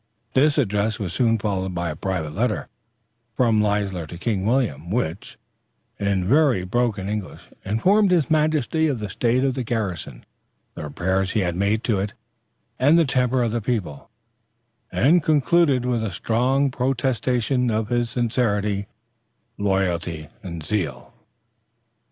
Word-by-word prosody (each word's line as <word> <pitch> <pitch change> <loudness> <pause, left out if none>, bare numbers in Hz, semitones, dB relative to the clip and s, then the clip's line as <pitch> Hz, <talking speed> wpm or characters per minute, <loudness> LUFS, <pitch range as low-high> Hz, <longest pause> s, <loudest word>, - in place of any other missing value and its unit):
This 145 +3 +3
address 105 -4 +1
was 95 -5 -4
soon 115 -2 +2
followed 95 -3 -2
by 85 -1 -2
a - - -6
private 85 -4 -3
letter 110 +3 -1 0.7
from 115 -4 +3
Leisler 100 -5 -1
to 85 - -9
King 100 0 -1
William, 110 - 0
which, 95 -4 -3 0.6
in 100 -3 0
very 135 -6 +3
broken 105 -1 -1
English, 105 -2 -5
informed 190 - +3
his 175 -5 +3
majesty 155 0 +1
of 140 -4 0
the 105 -4 -5
state 120 +5 +1
of 135 -1 +1
the 130 - -3
garrison, 95 - -4 0.5
the - - -8
repairs 95 +5 -1
he 110 - +2
had 90 -2 -1
made 100 +4 0
to 110 -5 +1
it, 100 +1 -3 0.7
and 145 +6 +5
the 165 - +4
temper 125 -1 +1
of 115 - 0
the 120 +1 -1
people, 100 - -3 0.8
and 165 +7 +4
concluded 150 -3 +3
with 120 -3 0
a 110 - -1
strong 125 +8 +1
protestation 125 -1 0
of 110 -1 -1
his 120 -1 0
sincerity, 105 -4 0 0.7
loyalty 90 -5 -1
and 85 -4 -7
zeal. 80 -6 -3
110 Hz, 145 wpm, -23 LUFS, 95-125 Hz, 0.8 s, and